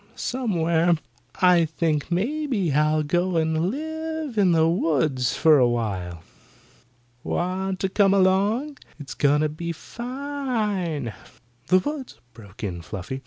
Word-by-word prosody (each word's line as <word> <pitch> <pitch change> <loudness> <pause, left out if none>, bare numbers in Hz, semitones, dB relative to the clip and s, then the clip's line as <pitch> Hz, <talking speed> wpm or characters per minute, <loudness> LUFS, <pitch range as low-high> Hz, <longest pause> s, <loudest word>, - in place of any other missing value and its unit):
"Somewhere. 170 -9 +1 0.5
I 180 -2 +6
think 160 -2 -1
maybe 220 - 0
I'll 155 +1 +2
go 175 +3 0
and 160 +2 +1
live 315 +1 -4
in 195 -4 +4
the 160 -1 +4
woods 150 -7 +1
for 155 -3 +5
awhile. 100 -9 -1 1.0
Want 185 +1 -2
to 190 - 0
come 195 0 +3
along? 200 +9 +2 0.2
It's 135 -4 -7
going 145 +4 +2
to 155 - +1
be 170 +3 -5
fine." 225 - -3 0.5
"The 185 - +5
woods!" 270 +7 -4
broke 105 -2 -13
in 90 -4 -4
Fluffy. 95 +9 -6
175 Hz, 120 wpm, -24 LUFS, 150-215 Hz, 1.0 s, I